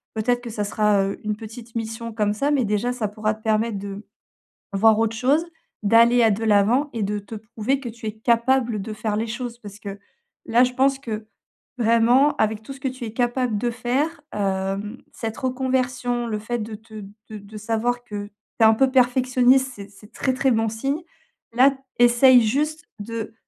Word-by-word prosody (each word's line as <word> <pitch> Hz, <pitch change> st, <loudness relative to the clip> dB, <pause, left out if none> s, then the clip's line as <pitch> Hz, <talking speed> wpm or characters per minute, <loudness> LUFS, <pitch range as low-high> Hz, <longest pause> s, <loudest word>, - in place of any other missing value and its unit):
peut-être, 245 Hz, +3 st, 0 dB
que 240 Hz, -, -7 dB
ça 210 Hz, -1 st, -3 dB
sera, 205 Hz, -1 st, +2 dB
heu, 195 Hz, 0 st, -3 dB
une 210 Hz, 0 st, -1 dB
petite 225 Hz, +2 st, -11 dB
mission 225 Hz, +1 st, -4 dB
comme 210 Hz, -1 st, 0 dB
ça, 280 Hz, +7 st, -1 dB
mais 280 Hz, -3 st, +2 dB
déjà, 210 Hz, +4 st, 0 dB
ça 225 Hz, -4 st, -2 dB
pourra 215 Hz, +1 st, -1 dB
te 220 Hz, -, -22 dB
permettre 220 Hz, 0 st, +1 dB
de 200 Hz, +1 st, -7 dB, 0.7 s
voir 220 Hz, +2 st, +4 dB
autre 225 Hz, 0 st, 0 dB
chose. 275 Hz, +8 st, +2 dB, 0.4 s
D'aller 235 Hz, +3 st, +5 dB
à 225 Hz, -, +5 dB
de 220 Hz, +3 st, -2 dB
l'avant 220 Hz, +7 st, +3 dB
et 225 Hz, -, -2 dB
de 205 Hz, +1 st, -2 dB
te 205 Hz, +2 st, -10 dB
prouver 220 Hz, +5 st, -2 dB
que 250 Hz, -, -6 dB
tu 230 Hz, 0 st, -11 dB
es -, -, -1 dB
capable 235 Hz, 0 st, +1 dB
de 215 Hz, +2 st, -6 dB
faire 215 Hz, 0 st, -2 dB
les 220 Hz, +2 st, -1 dB
choses. 240 Hz, +1 st, -5 dB
Parce 205 Hz, -1 st, -11 dB
que 200 Hz, -1 st, -7 dB, 0.5 s
là, 235 Hz, +2 st, +4 dB
je 250 Hz, -, -4 dB
pense 270 Hz, +1 st, +2 dB
que, 215 Hz, -4 st, -6 dB, 0.5 s
vraiment, 235 Hz, +5 st, +4 dB
avec 215 Hz, 0 st, 0 dB
tout 275 Hz, -, -8 dB
ce 270 Hz, -, -14 dB
que 265 Hz, -, -1 dB
tu 255 Hz, -2 st, -7 dB
es 220 Hz, -, -7 dB
capable 240 Hz, -2 st, 0 dB
de 240 Hz, +3 st, -1 dB
faire, 275 Hz, +7 st, -1 dB
hem, 195 Hz, +2 st, -2 dB, 0.2 s
cette 225 Hz, -1 st, -5 dB
reconversion, 255 Hz, -2 st, -1 dB
le 215 Hz, -2 st, -2 dB
fait 240 Hz, +3 st, -3 dB
de 215 Hz, 0 st, -6 dB
te 220 Hz, +1 st, -15 dB, 0.3 s
de 215 Hz, -, -7 dB
de 205 Hz, +1 st, -11 dB
savoir 230 Hz, +3 st, -1 dB
que 205 Hz, -4 st, -6 dB
tu 205 Hz, -, -22 dB, 0.3 s
es -, -, +8 dB
un 220 Hz, -, +7 dB
peu 265 Hz, +4 st, +3 dB
perfectionniste, 255 Hz, +1 st, +3 dB
c'est 200 Hz, 0 st, -10 dB
c'est 205 Hz, +1 st, -17 dB
très, 260 Hz, -, -1 dB
très 265 Hz, +1 st, +1 dB
bon 225 Hz, -1 st, +1 dB
signe. 275 Hz, +8 st, -2 dB, 0.5 s
Là, 265 Hz, +3 st, +4 dB, 0.2 s
essaye 245 Hz, +1 st, +6 dB
juste 300 Hz, +8 st, -1 dB
de 225 Hz, +1 st, -5 dB
230 Hz, 200 wpm, -23 LUFS, 215-250 Hz, 0.7 s, es